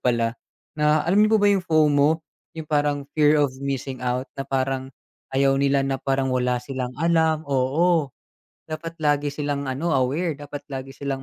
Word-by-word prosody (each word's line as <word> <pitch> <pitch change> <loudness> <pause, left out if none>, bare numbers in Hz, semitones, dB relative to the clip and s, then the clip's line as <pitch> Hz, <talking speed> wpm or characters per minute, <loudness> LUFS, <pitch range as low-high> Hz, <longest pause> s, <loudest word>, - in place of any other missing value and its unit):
pala, 115 -2 +1 0.4
na 150 0 +2
alam 190 +5 +3
niyo 215 +1 +5
po - - +2
ba 205 - +6
yung 195 - +2
FOMO 155 -2 +3 0.3
yung 160 - -5
parang 145 -1 0
fear 150 0 +4
of 145 -3 +2
missing 135 -1 -4
out. 125 +1 -1
Na 135 - -4
parang, 130 0 -1 0.5
ayaw 135 0 +4
nila 140 0 +2
na 135 -1 -2
parang 135 -1 0
wala 125 -1 +1
silang 125 0 -5
alam 160 0 +2
oo, 145 +4 +2 0.6
dapat 165 +1 -6
lagi 145 -2 +1
silang 145 -1 -3
ano, 155 +5 -1
aware, 145 +6 0
dapat 145 0 -9
lagi 135 -1 -6
silang 135 -1 -4
140 Hz, 170 wpm, -23 LUFS, 135-155 Hz, 0.6 s, ba